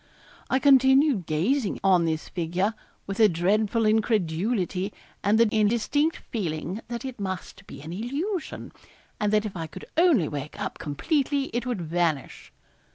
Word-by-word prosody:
I 260 Hz, -, +3 dB
continued 265 Hz, -, +4 dB
gazing 200 Hz, -, 0 dB
on 185 Hz, -3 st, +4 dB
this 160 Hz, -1 st, -2 dB
figure 180 Hz, +4 st, -1 dB, 0.3 s
with 195 Hz, +1 st, -5 dB
a 215 Hz, -2 st, +7 dB
dreadful 210 Hz, +6 st, +1 dB
incredulity, 205 Hz, -2 st, 0 dB, 0.3 s
and 205 Hz, +2 st, +3 dB
the 230 Hz, 0 st, +5 dB
indistinct 235 Hz, +9 st, +2 dB
feeling 180 Hz, -1 st, -3 dB
that 235 Hz, +1 st, -5 dB
it 260 Hz, -4 st, -6 dB
must 190 Hz, 0 st, -6 dB
be 140 Hz, -, -10 dB
an 160 Hz, +3 st, -7 dB
illusion 300 Hz, -, -4 dB, 0.5 s
and 210 Hz, -2 st, +1 dB
that 215 Hz, 0 st, +2 dB
if 205 Hz, -, -5 dB
I 165 Hz, -2 st, -4 dB
could -, -, -10 dB
only 320 Hz, -, +4 dB
wake 145 Hz, +5 st, -6 dB
up 205 Hz, -, -4 dB
completely, 275 Hz, -, -1 dB
it 240 Hz, +1 st, -2 dB
would 240 Hz, -7 st, -2 dB
vanish. 165 Hz, -3 st, -2 dB
210 Hz, 150 wpm, -26 LUFS, 175-245 Hz, 0.5 s, a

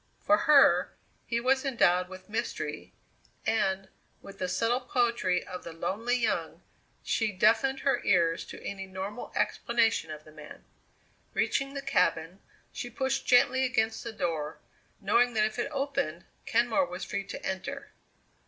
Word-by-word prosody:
For 310 Hz, -, +4 dB
her, 300 Hz, -4 st, +5 dB, 0.3 s
he 235 Hz, -, 0 dB
was 265 Hz, +2 st, +2 dB
endowed 180 Hz, -9 st, +2 dB
with 185 Hz, 0 st, -11 dB
mystery, 225 Hz, +3 st, -4 dB, 0.5 s
and, 195 Hz, -3 st, 0 dB, 0.3 s
with 200 Hz, -, -13 dB
the 185 Hz, -, -1 dB
subtle 230 Hz, +7 st, +1 dB
poetry 235 Hz, -7 st, 0 dB
of 180 Hz, 0 st, -7 dB
the 170 Hz, -, -8 dB
lonely 220 Hz, +9 st, -1 dB
young, 240 Hz, 0 st, -2 dB, 0.4 s
she 225 Hz, -2 st, 0 dB
deafened 225 Hz, +7 st, +2 dB
her 275 Hz, -, +1 dB
ears 165 Hz, -2 st, +2 dB
to -, -, -10 dB
any 195 Hz, -1 st, -5 dB
normal 190 Hz, +5 st, -6 dB
explanation 225 Hz, -7 st, +1 dB
of 155 Hz, 0 st, -8 dB
the 155 Hz, -, -15 dB
man. 150 Hz, -1 st, -12 dB, 0.7 s
Reaching 275 Hz, +1 st, 0 dB
the 275 Hz, -, -4 dB
cabin, 180 Hz, -4 st, +1 dB, 0.3 s
she 245 Hz, -, -6 dB
pushed 265 Hz, +2 st, -2 dB
gently 260 Hz, +1 st, +5 dB
against 225 Hz, -3 st, 0 dB
the 230 Hz, -, -5 dB
door, 160 Hz, -6 st, -3 dB, 0.4 s
knowing 235 Hz, +4 st, +2 dB
that 215 Hz, -1 st, +4 dB
if 220 Hz, +3 st, -4 dB
it 240 Hz, -, -1 dB
opened, 275 Hz, -, -2 dB, 0.2 s
Kenmore 240 Hz, +4 st, +2 dB
was 180 Hz, +1 st, -6 dB
free 200 Hz, -, -3 dB
to -, -, -7 dB
enter. 190 Hz, 0 st, -4 dB
220 Hz, 150 wpm, -29 LUFS, 185-250 Hz, 0.7 s, her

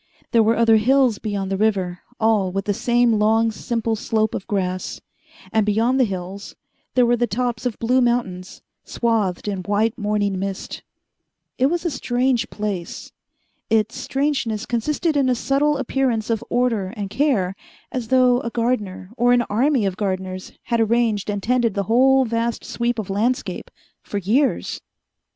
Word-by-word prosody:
There 230 Hz, -, +5 dB
were 225 Hz, +1 st, +3 dB
other 225 Hz, -1 st, +5 dB
hills 250 Hz, 0 st, +3 dB
beyond 200 Hz, -3 st, -3 dB
the 195 Hz, -, 0 dB
river, 190 Hz, -4 st, 0 dB, 0.2 s
all 215 Hz, -4 st, +2 dB
with 195 Hz, +1 st, -3 dB
the 205 Hz, -, +1 dB
same 240 Hz, 0 st, +2 dB
long, 225 Hz, +2 st, +3 dB
simple 225 Hz, 0 st, -2 dB
slope 220 Hz, 0 st, 0 dB
of 190 Hz, -, -5 dB
grass; 185 Hz, -2 st, -2 dB, 0.5 s
and, 220 Hz, -, +3 dB
beyond 225 Hz, +5 st, +2 dB
the 255 Hz, -, +5 dB
hills, 190 Hz, 0 st, -6 dB, 0.4 s
there 250 Hz, -1 st, +5 dB
were 240 Hz, 0 st, +3 dB
the 240 Hz, 0 st, 0 dB
tops 245 Hz, +2 st, -1 dB
of 235 Hz, -, -4 dB
blue 250 Hz, +3 st, +2 dB
mountains, 230 Hz, -7 st, -1 dB, 0.2 s
swathed 215 Hz, -6 st, -1 dB
in 200 Hz, -2 st, -2 dB
white 210 Hz, +5 st, 0 dB
morning 205 Hz, -2 st, 0 dB
mist. 195 Hz, 0 st, -5 dB, 0.8 s
It 260 Hz, -, +4 dB
was 345 Hz, +3 st, -2 dB
a 340 Hz, -, 0 dB
strange 245 Hz, -2 st, 0 dB
place. 205 Hz, -5 st, -5 dB, 0.6 s
Its 220 Hz, +1 st, +1 dB
strangeness 270 Hz, -6 st, -1 dB
consisted 300 Hz, +7 st, -1 dB
in 275 Hz, -2 st, +2 dB
a 250 Hz, -, +2 dB
subtle 280 Hz, +4 st, +1 dB
appearance 260 Hz, -4 st, -1 dB
of 225 Hz, 0 st, -1 dB
order 235 Hz, -6 st, +1 dB
and 200 Hz, -2 st, -4 dB
care, 215 Hz, -8 st, +1 dB, 0.4 s
as 250 Hz, -3 st, -3 dB
though 250 Hz, 0 st, +4 dB
a 230 Hz, -, -3 dB
gardener 225 Hz, -6 st, -2 dB
or 245 Hz, +1 st, +4 dB
an 245 Hz, -1 st, +3 dB
army 250 Hz, +1 st, +2 dB
of 190 Hz, -1 st, -2 dB
gardeners 185 Hz, -2 st, -3 dB
had 235 Hz, -, 0 dB
arranged 225 Hz, -2 st, +1 dB
and 205 Hz, -1 st, -2 dB
tended 240 Hz, -3 st, +1 dB
the 200 Hz, -, 0 dB
whole 260 Hz, +5 st, +4 dB
vast 230 Hz, 0 st, -2 dB
sweep 240 Hz, 0 st, -1 dB
of 205 Hz, -3 st, -4 dB
landscape 230 Hz, +6 st, -1 dB, 0.3 s
for 205 Hz, -, -5 dB
years. 230 Hz, +9 st, 0 dB
225 Hz, 165 wpm, -21 LUFS, 205-245 Hz, 0.8 s, There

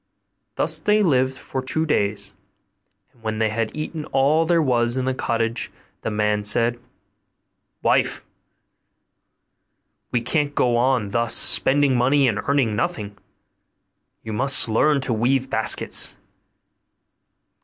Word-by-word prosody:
Thus -, -, +3 dB
they 210 Hz, 0 st, +2 dB
lived 130 Hz, -5 st, +1 dB
for 130 Hz, -, -6 dB
two 155 Hz, +5 st, -2 dB
days: 100 Hz, -7 st, -1 dB, 0.8 s
and 120 Hz, -, -28 dB
when 110 Hz, -1 st, -4 dB
they 110 Hz, 0 st, 0 dB
had 110 Hz, +1 st, -2 dB
eaten 155 Hz, 0 st, -5 dB
up -, -, -17 dB
all 145 Hz, +5 st, +3 dB
there 170 Hz, 0 st, +2 dB
was 120 Hz, -4 st, +1 dB
in 130 Hz, -, -1 dB
the 130 Hz, -, -1 dB
cottage, 115 Hz, -1 st, -2 dB, 0.3 s
the -, -, -3 dB
man 105 Hz, -1 st, -1 dB
said, 115 Hz, +3 st, +1 dB, 1.0 s
'Wife, -, -, 0 dB, 1.9 s
we 120 Hz, -, +1 dB
can't 145 Hz, +4 st, -2 dB
go 120 Hz, -1 st, +1 dB
on 120 Hz, -4 st, 0 dB
thus, 115 Hz, 0 st, +2 dB
spending 140 Hz, -1 st, +4 dB
money 135 Hz, +3 st, +2 dB
and 110 Hz, -4 st, -1 dB
earning 135 Hz, -7 st, +1 dB
nothing. 100 Hz, 0 st, -3 dB, 1.1 s
You 110 Hz, -, -6 dB
must 135 Hz, +5 st, +3 dB
learn 140 Hz, +6 st, +2 dB
to 130 Hz, -2 st, -2 dB
weave 130 Hz, +4 st, 0 dB
baskets. 110 Hz, -, 0 dB
125 Hz, 130 wpm, -21 LUFS, 110-140 Hz, 1.9 s, spending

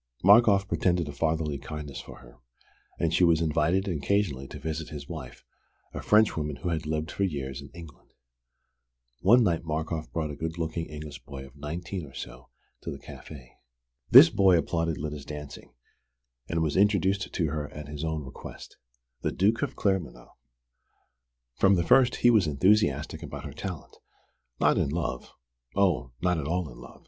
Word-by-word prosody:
Markoff 100 Hz, 0 st, +6 dB
pretended 90 Hz, -4 st, +1 dB
a -, -, -5 dB
fatherly 80 Hz, -1 st, -1 dB
kindness 75 Hz, 0 st, -7 dB
for -, -, -12 dB
her; -, -, -17 dB, 0.6 s
and 80 Hz, -1 st, 0 dB
she 90 Hz, -, +3 dB
was 85 Hz, -2 st, +5 dB
invited 85 Hz, +4 st, +1 dB
occasionally 80 Hz, -4 st, 0 dB
to -, -, -9 dB
visit 80 Hz, 0 st, -4 dB
his 70 Hz, -2 st, -8 dB
wife, -, -, -9 dB, 0.5 s
a -, -, -5 dB
Frenchwoman 80 Hz, -9 st, +2 dB
who 90 Hz, -, -4 dB
had 80 Hz, -2 st, -2 dB
lived 80 Hz, +1 st, -2 dB
for -, -, -6 dB
years 70 Hz, -6 st, -3 dB
in 70 Hz, -, -11 dB
England. 80 Hz, -6 st, -12 dB, 1.1 s
One 115 Hz, +7 st, +6 dB
night 85 Hz, -6 st, +1 dB
Markoff 80 Hz, 0 st, -3 dB
brought 80 Hz, -2 st, -2 dB
a -, -, -6 dB
good 80 Hz, +3 st, -4 dB
looking 80 Hz, 0 st, -3 dB
English 75 Hz, -3 st, -9 dB
boy 65 Hz, -1 st, -9 dB
of 65 Hz, 0 st, -16 dB
nineteen 85 Hz, +3 st, -5 dB
or 70 Hz, -, -15 dB
so 65 Hz, +2 st, -9 dB, 0.3 s
to -, -, -6 dB
the -, -, -5 dB
café. 65 Hz, -6 st, -11 dB, 0.6 s
This -, -, +10 dB
boy 95 Hz, -3 st, +5 dB
applauded 80 Hz, -1 st, -1 dB
Lyda's 75 Hz, -1 st, -5 dB
dancing, 75 Hz, 0 st, -9 dB, 0.7 s
and 85 Hz, -1 st, 0 dB
was 75 Hz, -2 st, -1 dB
introduced 100 Hz, 0 st, +2 dB
to 85 Hz, -, 0 dB
her 75 Hz, -2 st, -3 dB
at 75 Hz, -1 st, -8 dB
his 75 Hz, +1 st, -6 dB
own 80 Hz, -2 st, -2 dB
request: 65 Hz, -, -11 dB, 0.4 s
The -, -, -1 dB
Duke 110 Hz, +5 st, +1 dB
of 140 Hz, -2 st, -2 dB
Claremanagh. 80 Hz, -, -2 dB, 1.3 s
From 95 Hz, 0 st, +5 dB
the 85 Hz, -, +1 dB
first 130 Hz, +4 st, +5 dB
he 120 Hz, -, +8 dB
was 105 Hz, -7 st, +4 dB
enthusiastic 75 Hz, -1 st, +2 dB
about -, -, -7 dB
her -, -, -7 dB
talent: 90 Hz, -6 st, -7 dB, 0.6 s
not -, -, +3 dB
in -, -, +1 dB
love 75 Hz, -5 st, -4 dB, 0.4 s
("oh, 90 Hz, -11 st, +1 dB
not 90 Hz, -2 st, +2 dB
at 70 Hz, -, -4 dB
all 90 Hz, 0 st, -1 dB
in -, -, -13 dB
love!" -, -, -13 dB
80 Hz, 170 wpm, -27 LUFS, 75-90 Hz, 1.3 s, This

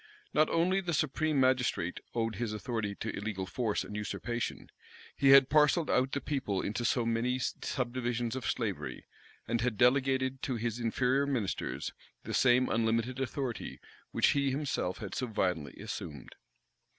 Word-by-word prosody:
Not 155 Hz, -, +4 dB
only 185 Hz, +4 st, +2 dB
the 175 Hz, -3 st, -1 dB
supreme 155 Hz, 0 st, +1 dB
magistrate 130 Hz, -9 st, +1 dB, 0.2 s
owed 115 Hz, -1 st, -1 dB
his 115 Hz, -3 st, -2 dB
authority 110 Hz, -2 st, -3 dB
to 115 Hz, +1 st, -4 dB
illegal 100 Hz, -2 st, -3 dB
force 105 Hz, +3 st, -1 dB
and 105 Hz, -, -8 dB
usurpation; 120 Hz, +2 st, -3 dB, 0.4 s
he 135 Hz, -, +3 dB
had 135 Hz, -1 st, +9 dB
parcelled 155 Hz, +2 st, +4 dB
out 130 Hz, +1 st, +2 dB
the 140 Hz, -, +1 dB
people 135 Hz, -10 st, -2 dB
into 110 Hz, +5 st, -2 dB
so 120 Hz, -1 st, +2 dB
many 115 Hz, +2 st, +1 dB
subdivisions 120 Hz, -2 st, -2 dB
of 130 Hz, -, -3 dB
slavery, -, -, -3 dB, 0.4 s
and 115 Hz, 0 st, 0 dB
had 120 Hz, -3 st, 0 dB
delegated 130 Hz, +1 st, +3 dB
to 130 Hz, -, -2 dB
his 115 Hz, 0 st, -2 dB
inferior 125 Hz, +4 st, +1 dB
ministers 120 Hz, -8 st, -2 dB, 0.3 s
the -, -, -5 dB
same 125 Hz, 0 st, +4 dB
unlimited 115 Hz, +3 st, 0 dB
authority 135 Hz, -2 st, -3 dB, 0.3 s
which -, -, +3 dB
he 140 Hz, -1 st, +2 dB
himself 135 Hz, -9 st, -1 dB
had -, -, -6 dB
so 125 Hz, -, -2 dB
violently 90 Hz, -, -1 dB
assumed. 70 Hz, -5 st, -7 dB
125 Hz, 150 wpm, -31 LUFS, 110-135 Hz, 0.4 s, had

